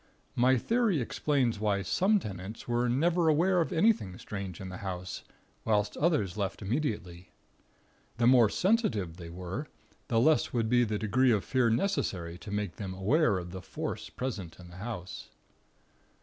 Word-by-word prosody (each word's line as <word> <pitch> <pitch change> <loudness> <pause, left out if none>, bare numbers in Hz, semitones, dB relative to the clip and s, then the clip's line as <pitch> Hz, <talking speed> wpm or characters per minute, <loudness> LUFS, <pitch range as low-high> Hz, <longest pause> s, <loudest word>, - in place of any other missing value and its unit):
My 130 +2 +4
theory 225 - +1
explains 125 -2 0
why 100 -2 0
some 195 - +3
tenants 100 - -7
were 120 0 +1
never 165 +7 +2
aware 175 +4 +3
of 165 - -2
anything 165 - +2
strange 95 -4 -6
in 95 - -6
the 95 - -7
house, 90 -2 -5 0.4
whilst 105 -2 +1
others 145 - +1
left 100 0 -3
immediately. 100 - -3 0.9
The 120 - +2
more 120 -3 +6
sensitive 115 - +1
they 85 -2 -8
were, 90 - -5 0.4
the 115 - +2
less 155 +6 +3
would 115 -2 0
be 120 0 +4
the 105 -1 -2
degree 125 +5 +2
of 105 -4 +2
fear 130 -3 +2
necessary 95 - -1
to 90 - -10
make 105 -3 -3
them 95 -3 -5
aware 105 - +2
of 90 -1 -6
the 95 0 -7
Force - - -5
present 100 -11 -5
in 90 -1 -12
the 90 - -12
house. 95 -3 -6
110 Hz, 165 wpm, -30 LUFS, 95-140 Hz, 0.9 s, more